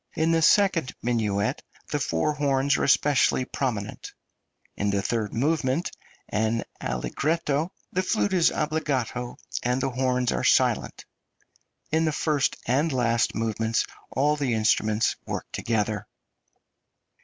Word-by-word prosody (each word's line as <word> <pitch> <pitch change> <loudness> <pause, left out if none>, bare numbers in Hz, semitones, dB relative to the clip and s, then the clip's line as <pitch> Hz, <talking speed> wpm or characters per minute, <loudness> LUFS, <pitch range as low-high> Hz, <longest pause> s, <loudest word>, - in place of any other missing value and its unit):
In 160 0 +2
the 165 0 +3
second 170 -4 +3
minuet 110 -4 0 0.3
the - - 0
four 85 - 0
horns 140 -1 +1
are - - 0
especially 140 -2 +3
prominent; 120 -7 -4 0.6
in 100 - -1
the 100 -1 0
third 110 -2 -1
movement, 140 +4 0 0.4
an 110 +2 0 0.2
allegretto, 150 - -1 0.2
the 185 - +2
flute 200 +1 0
is 175 -3 +5
obbligato 130 -6 -2 0.2
and 125 +1 0
the 135 - -1
horns 125 -1 0
are - - -1
silent; - - +2 0.9
in 160 +1 +2
the 155 - +1
first 150 -3 +1
and 140 +7 +1
last 120 -3 +1
movements 110 0 0 0.2
all 145 +3 +2
the 135 -5 0
instruments 110 0 +2
work - - -3
together. 110 -2 -1
130 Hz, 125 wpm, -26 LUFS, 115-150 Hz, 0.9 s, is